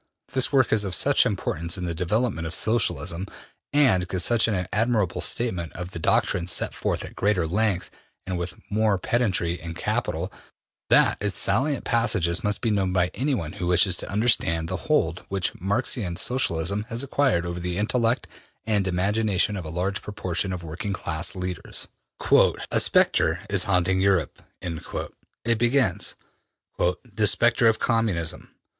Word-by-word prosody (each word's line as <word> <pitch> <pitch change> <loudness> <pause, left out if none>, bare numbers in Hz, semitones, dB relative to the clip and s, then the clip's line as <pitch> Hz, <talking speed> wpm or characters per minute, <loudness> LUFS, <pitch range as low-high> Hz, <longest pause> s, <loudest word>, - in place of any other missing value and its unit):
This 130 -1 +2
work 130 -5 +3
is 105 -2 +3
of 95 -3 +1
such - - +4
importance 85 +3 -2
in 90 - -4
the 85 - -2
development 90 0 -1
of 85 - -3
Socialism 105 -5 0 0.4
and 130 -12 +3
gives 90 -1 -1
such 120 -1 +3
an 95 -5 -1
admirable 105 -4 +1
statement 95 -9 -1
of 90 +1 -7
the 85 - -6
doctrines 85 +2 +1
set - - 0
forth - - -2
at - - -11
greater 100 -4 +1
length 100 +1 0 0.3
and 95 -1 -3
with 85 0 -4 0.2
more 105 -1 +2
pedantry 90 -5 0
in 85 0 -7
``Capital,'' - - -2 0.6
that - - +4
its 105 -4 -2
salient 130 - +1
passages 95 -7 +1
must 105 0 -1
be 115 - 0
known 95 -3 0
by 90 -1 +1
anyone 125 - -2
who 90 - -4
wishes 90 +1 +4
to - - -3
understand 100 -7 +1
the - - -3
hold 85 +3 +1
which 95 -1 -1
Marxian 100 -1 0
Socialism 100 -3 0
has 115 +2 -2
acquired 135 -10 +1
over 85 0 -4
the 90 0 -3
intellect 115 +3 +1 0.4
and 105 -3 +1
imagination 100 +2 +1
of 90 -4 -5
a - - -5
large 90 +4 -2
proportion 95 -2 -3
of 90 -2 -5
working 85 +6 -4
class 85 -2 -1
leaders. 90 -2 -5 0.3
``A - - +3
spectre 85 0 +3
is 100 0 +3
haunting 95 -1 +2
Europe,'' 95 -4 +1 1.0
it 115 -1 +1
begins, 120 -5 +1 0.6
``the 105 +3 +1
spectre 120 0 +3
of 110 - +3
Communism. 110 -9 -1
95 Hz, 155 wpm, -25 LUFS, 85-110 Hz, 1.0 s, such